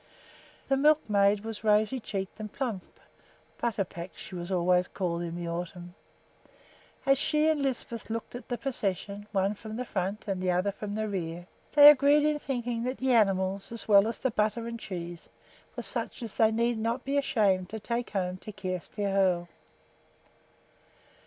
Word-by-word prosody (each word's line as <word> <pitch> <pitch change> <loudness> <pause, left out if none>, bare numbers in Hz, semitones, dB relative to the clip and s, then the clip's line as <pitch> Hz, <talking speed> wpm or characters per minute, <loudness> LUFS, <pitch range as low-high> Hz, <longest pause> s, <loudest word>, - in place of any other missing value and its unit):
The 270 - +2
milkmaid 210 -9 +3
was 225 0 -6
rosy 215 +4 +3
cheeked 195 -3 -5
and 215 -1 -6
plump 235 -9 -5 0.6
("Butterpack" 195 -6 -2
she - - -10
was 175 +1 -5
always 180 0 +3
called 175 -3 -2
in 170 -1 -4
the 175 0 -4
autumn). 175 +1 -5 1.1
As 275 -1 +4
she 305 +1 +2
and 310 -2 +2
Lisbeth 240 -4 -3
looked 230 0 -4
at 245 - -8
the 245 - -1
procession, 205 -5 -3
one 195 0 +1
from 215 +1 -8
the 250 +2 -3
front 195 0 -3
and 190 -2 -2
the 185 - 0
other 180 +3 +1
from 205 +1 -6
the 215 0 -1
rear, 175 -3 -4 0.3
they 290 -1 +10
agreed 290 +1 +4
in 300 -1 +1
thinking 245 -4 -3
that 255 +1 -2
the 260 -1 +1
animals, 195 -3 +2
as 230 - -3
well 200 -1 +6
as 230 - -3
the 260 - -1
butter 215 +2 0
and 230 0 -5
cheese, 175 -4 -7 0.5
were - - -5
such - - -3
as 225 - -6
they 220 -1 +4
need 235 +1 +1
not 230 +3 -2
be 275 +1 -1
ashamed 200 -9 +2
to 220 - -5
take 235 +2 -3
home 185 -2 -2
to 215 - -9
Kjersti 185 +1 -5
Hoel. 190 -3 +2
210 Hz, 170 wpm, -29 LUFS, 185-240 Hz, 1.1 s, they